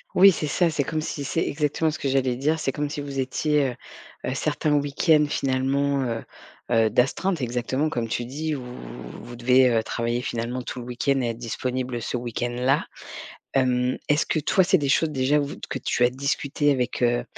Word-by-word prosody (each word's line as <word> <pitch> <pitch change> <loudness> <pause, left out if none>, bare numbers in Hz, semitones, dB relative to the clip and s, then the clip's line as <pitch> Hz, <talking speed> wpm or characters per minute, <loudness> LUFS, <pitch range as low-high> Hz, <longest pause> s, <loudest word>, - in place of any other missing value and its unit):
Oui 195 +1 +9
c'est 155 - -2
ça, 170 +4 +2
c'est 155 -3 0
comme 155 +3 -2
si 150 -2 -4
c'est 165 - 0
exactement 150 +2 0
ce - - -6
que - - -2
j'allais 130 -2 +1
dire, 155 +4 +1
c'est 135 - 0
comme 145 +1 -2
si 145 0 -4
vous 140 -1 -5
étiez, 140 +2 +1
heu - - -9 0.5
heu, 130 - -1
certains 150 +2 -1
week-end 150 +2 +3
finalement, 135 0 0
heu 115 -1 -3 0.5
heu, 115 -2 +4
d'astreinte. 135 - +1
Exactement 125 +4 -1
comme 120 -6 -2
tu 120 +2 -2
dis. 150 +4 -3
Où 130 - -6 0.6
vous 120 +1 -9
devez, 125 +2 +4
heu, 115 -2 +2
travailler 120 +2 -2
finalement 120 +1 -3
tout 125 - -6
le 120 - -7
week-end 130 +3 0
et 120 - 0
être 115 - -4
disponibles 125 +1 -3
ce 115 - -3
week-end 120 0 -3
là. 130 +3 +2 0.7
Hem, 125 -1 +2
est-ce 145 +1 +3
que - - 0
toi 185 +5 +3
c'est 190 - +4
des 145 -2 -1
choses 160 +2 +3
déjà 140 +1 +2
ou 145 - -1 0.2
que - - -2
tu 120 - +1
as 120 - +4
discuté 140 +2 0
avec, 125 -2 -1
heu 120 0 +2
135 Hz, 205 wpm, -24 LUFS, 125-145 Hz, 0.7 s, Oui